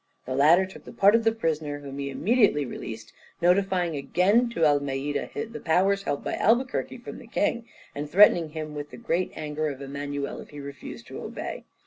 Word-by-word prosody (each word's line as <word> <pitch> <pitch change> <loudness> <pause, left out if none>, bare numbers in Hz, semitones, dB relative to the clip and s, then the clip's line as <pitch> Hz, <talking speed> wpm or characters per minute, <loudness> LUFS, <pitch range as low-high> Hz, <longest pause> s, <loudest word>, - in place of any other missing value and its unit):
The 130 - -3
latter 155 +8 +5
took 190 - -12
the - - -9
part 200 +1 +5
of 230 0 +4
the 225 - +4
prisoner, 155 -9 -2
whom 140 -1 -8
he 140 0 -3
immediately 195 - +2
released, 115 -2 -7 0.3
notifying 180 -1 +2
again 195 - +2
to 165 -9 +1
Almeida 145 -1 0
the 230 +1 -4
powers 195 +4 +2
held 145 -7 -3
by - - -3
Albuquerque 255 +2 +1
from 240 - -9
the - - -13
king, 230 +1 -1 0.3
and 145 +1 -5
threatening 175 -2 +6
him 155 -1 -6
with 145 0 -6
the - - -11
great 185 -6 -1
anger 155 0 -3
of 140 -3 -5
Emmanuel 140 0 -4
if - - -13
he 145 - -10
refused 140 0 -9
to - - -7
obey. - - -6
160 Hz, 190 wpm, -26 LUFS, 145-200 Hz, 0.3 s, threatening